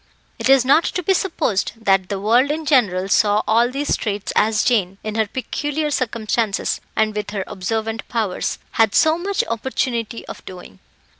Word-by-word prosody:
It - - -1
is 270 -2 +6
not 285 +5 +5
to 365 - -2
be 385 - +3
supposed 325 - -1
that 195 -4 +1
the 200 -2 -2
world 235 +7 +3
in 310 +1 -2
general 205 -10 +2
saw 205 +1 +3
all 230 +2 +3
these 280 +3 -1
traits 205 -1 -3
as 215 0 +3
Jane, 195 -6 +1
in 215 - -4
her 220 -1 0
peculiar 295 +5 -3
circumstances, 225 -4 -1
and 215 -1 +1
with 210 -1 -3
her 200 -2 -3
observant 220 +4 -3
powers, 220 -6 -2
had 220 -3 +2
so 315 +1 +4
much 395 +2 -1
opportunity 230 -1 -2
of - - -9
doing. 180 - -11
225 Hz, 170 wpm, -20 LUFS, 205-265 Hz, -, is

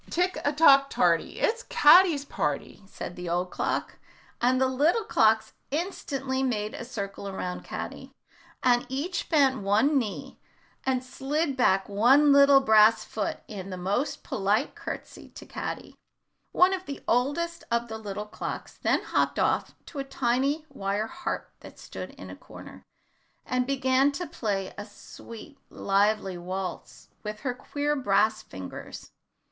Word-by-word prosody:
"Tick 360 +2 0
a 290 - +2
tock 275 -3 +6
tarty, 175 - +1
It's 465 -1 +1
Caddy's 320 - +5
party," 150 - -3
said 180 - -7
the 180 -1 -6
old 180 +2 -1
clock, - - -2 0.4
and 255 +2 +3
the 265 - +3
little 295 - +2
clocks 220 - +2 0.2
instantly 275 -5 -2
made 215 -5 -1
a - - -6
circle 200 -4 -6
around 180 -2 -5
Caddy, - - -7 0.5
and 245 -1 +4
each 305 +8 -3
bent 270 -6 +3
one 220 +9 +3
knee 215 -5 -6 0.5
and 260 -1 +1
slid 275 +3 -2
back 195 -6 +2
one 255 +9 +5
little 280 -1 +7
brass 220 -2 +5
foot 210 -2 -3
in 195 -2 -7
the 185 - -5
most 200 +10 -2
polite 210 +6 0
courtesy - - -8
to - - -10
Caddy. - - -6 0.6
One 365 +1 +4
of 375 0 -4
the 280 - -7
oldest 290 +8 0
of 235 0 0
the 220 -1 -6
little 210 -1 -5
clocks 210 - -7
then - - +1
hopped - - 0
off - - 0
to 290 - -8
a - - -1
tiny 270 +4 0
wire 200 +2 -2
harp - - -5
that - - -13
stood - - -8
in - - -10
a - - -8
corner, - - -12 0.6
and 250 0 -1
began 265 0 +2
to 355 +5 -4
play 200 - -3
a - - -4
sweet 230 +6 -12
lively 195 -2 +1
waltz 175 - -6
with 210 0 -6
her 255 -3 -2
queer 290 +3 -2
brass 215 -3 +2
fingers. 95 - -9
250 Hz, 150 wpm, -27 LUFS, 205-280 Hz, 0.6 s, little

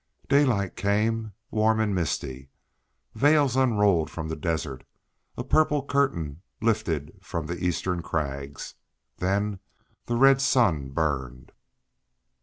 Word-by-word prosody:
Daylight 125 -10 +2
came 110 +2 0 0.2
warm 110 0 +2
and 110 -2 +1
misty; 70 -6 -3 0.6
veils 145 -2 +3
unrolled 105 - +3
from 80 -1 -6
the 80 - -3
desert; 80 -7 -3 0.5
a - - -3
purple 150 -3 +2
curtain 85 - 0 0.2
lifted 105 -10 -1
from 85 -2 -4
the 85 +3 -5
eastern 90 0 -1
crags; 70 -4 -4 0.4
then 100 +2 -1 0.5
the 120 - 0
red 135 +2 +5
sun 95 - +2
burned. 65 -4 -3
95 Hz, 110 wpm, -26 LUFS, 80-115 Hz, 0.6 s, red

